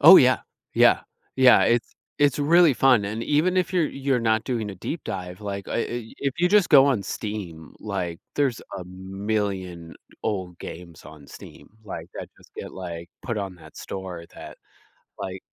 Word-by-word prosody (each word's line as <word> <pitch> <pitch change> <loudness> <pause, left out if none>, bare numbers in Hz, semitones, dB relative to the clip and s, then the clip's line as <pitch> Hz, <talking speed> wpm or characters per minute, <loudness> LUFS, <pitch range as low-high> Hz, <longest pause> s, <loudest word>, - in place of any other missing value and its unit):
Oh - - +11
yeah. - - +5 0.3
Yeah - - +5 0.4
yeah, 130 -2 +7
it's 120 0 +1 0.2
it's 145 0 +3
really 160 0 +5
fun, 125 -6 +4
and 110 +3 -3
even 165 +5 +2
if 185 0 +1
you're 175 -4 +2
you're 135 -2 0
not 110 -1 +1
doing 115 -5 -2
a - - -8
deep 155 - -5
dive, 90 +1 -5
like, 100 -2 -5
uh, - - -4
i 120 -1 -3
if 140 -2 -1
you 180 +1 +3
just 205 -2 +4
go 140 -3 +8
on 130 -8 +1
Steam, 95 -6 -6
like, 90 -5 -4
there's 140 -5 +1 0.2
a 90 - -7
million 95 -2 -4 0.3
old 95 -5 -3
games 85 0 -9
on 70 0 -13
Steam. - - -13 0.2
Like, 100 - -7
I - - -5
just - - -20
get, - - -7
like, 85 -2 -7
put 115 -4 -3
on 95 -2 -4
that - - -16
store 90 -3 -7
that, - - -10 0.6
like, 95 0 -6
105 Hz, 175 wpm, -25 LUFS, 90-135 Hz, 0.6 s, Oh